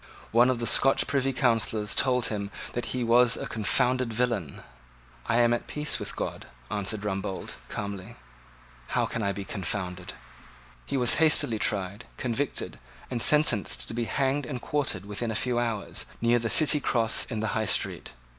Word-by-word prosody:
One 120 Hz, +3 st, +5 dB
of 130 Hz, -, +1 dB
the 115 Hz, -, -3 dB
Scotch 135 Hz, +3 st, +4 dB
Privy 135 Hz, -1 st, 0 dB
Councillors 115 Hz, -4 st, +1 dB
told 125 Hz, -2 st, +2 dB
him 100 Hz, -2 st, -3 dB, 0.2 s
that 120 Hz, -, -3 dB
he 125 Hz, -1 st, -2 dB
was 120 Hz, +1 st, +4 dB
a -, -, -5 dB
confounded 125 Hz, +3 st, 0 dB
villain. 115 Hz, -, -2 dB, 0.6 s
"I 115 Hz, -, +1 dB
am 120 Hz, 0 st, +4 dB
at 120 Hz, -, -3 dB
peace 150 Hz, 0 st, -1 dB
with -, -, -5 dB
God," -, -, -5 dB, 0.2 s
answered 105 Hz, +1 st, -2 dB
Rumbold, 95 Hz, -1 st, -4 dB
calmly; 100 Hz, +1 st, -6 dB, 0.7 s
"how -, -, 0 dB
then -, -, -8 dB
can 115 Hz, -, -2 dB
I 100 Hz, -1 st, 0 dB
be 100 Hz, 0 st, -6 dB
confounded?" 95 Hz, -1 st, -4 dB, 0.7 s
He 140 Hz, -, -1 dB
was 125 Hz, -2 st, +3 dB
hastily 145 Hz, -8 st, +5 dB
tried, 100 Hz, -1 st, -2 dB
convicted, 130 Hz, +3 st, -3 dB, 0.3 s
and 120 Hz, -2 st, 0 dB
sentenced 150 Hz, -9 st, +4 dB
to -, -, -5 dB
be 120 Hz, 0 st, -2 dB
hanged 135 Hz, +2 st, -1 dB
and 125 Hz, -2 st, -4 dB
quartered 130 Hz, -9 st, -1 dB
within 105 Hz, +3 st, -4 dB
a 110 Hz, -, -3 dB
few 120 Hz, +1 st, 0 dB
hours, 115 Hz, -4 st, -3 dB
near 120 Hz, +1 st, +3 dB
the 115 Hz, 0 st, -2 dB
City 150 Hz, +1 st, +5 dB
Cross 115 Hz, -5 st, +1 dB
in 115 Hz, -3 st, -5 dB
the 110 Hz, -, -1 dB
High 110 Hz, -1 st, 0 dB
Street. -, -, -1 dB
115 Hz, 175 wpm, -27 LUFS, 105-125 Hz, 0.7 s, One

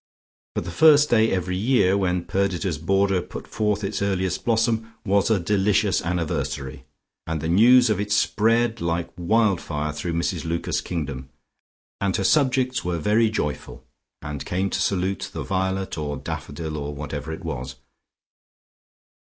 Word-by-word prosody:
But -, -, -1 dB
the 85 Hz, -, -6 dB
first 150 Hz, -, +5 dB
day 110 Hz, -1 st, +4 dB
every 90 Hz, 0 st, -1 dB
year 100 Hz, -2 st, +3 dB
when 90 Hz, -3 st, 0 dB
Perdita's 95 Hz, -2 st, -1 dB
border 95 Hz, +2 st, +2 dB
put -, -, -8 dB
forth 105 Hz, -1 st, -1 dB
its 100 Hz, +1 st, -3 dB
earliest 95 Hz, -2 st, -1 dB
blossom 115 Hz, -1 st, 0 dB
was 100 Hz, +1 st, +2 dB
a 110 Hz, -3 st, +3 dB
delicious 100 Hz, +1 st, +2 dB
anniversary, 75 Hz, -5 st, -3 dB, 0.4 s
and 80 Hz, -1 st, -2 dB
the 80 Hz, -, -3 dB
news 120 Hz, +7 st, +6 dB
of 105 Hz, -, 0 dB
it 105 Hz, 0 st, -4 dB
spread 115 Hz, +2 st, +2 dB
like 85 Hz, 0 st, -2 dB
wild 100 Hz, +1 st, +2 dB
fire 75 Hz, -1 st, -3 dB
through 80 Hz, +3 st, -4 dB
Mrs 85 Hz, 0 st, -1 dB
Lucas's 85 Hz, 0 st, -2 dB
kingdom, 70 Hz, -7 st, -5 dB, 0.7 s
and 100 Hz, -2 st, 0 dB
her 95 Hz, -, 0 dB
subjects 130 Hz, 0 st, +2 dB
were 90 Hz, -1 st, -1 dB
very 110 Hz, +7 st, +2 dB
joyful, 75 Hz, -11 st, -4 dB, 0.4 s
and 75 Hz, -1 st, -5 dB
came 95 Hz, +2 st, -2 dB
to -, -, -1 dB
salute 95 Hz, 0 st, -1 dB
the -, -, -4 dB
violet 95 Hz, -2 st, -2 dB
or 75 Hz, -1 st, -3 dB
daffodil, 75 Hz, +3 st, -5 dB
or 75 Hz, 0 st, -5 dB
whatever 75 Hz, +1 st, -5 dB
it 80 Hz, -, -7 dB
was. 65 Hz, +1 st, -5 dB
95 Hz, 155 wpm, -23 LUFS, 80-105 Hz, 0.7 s, news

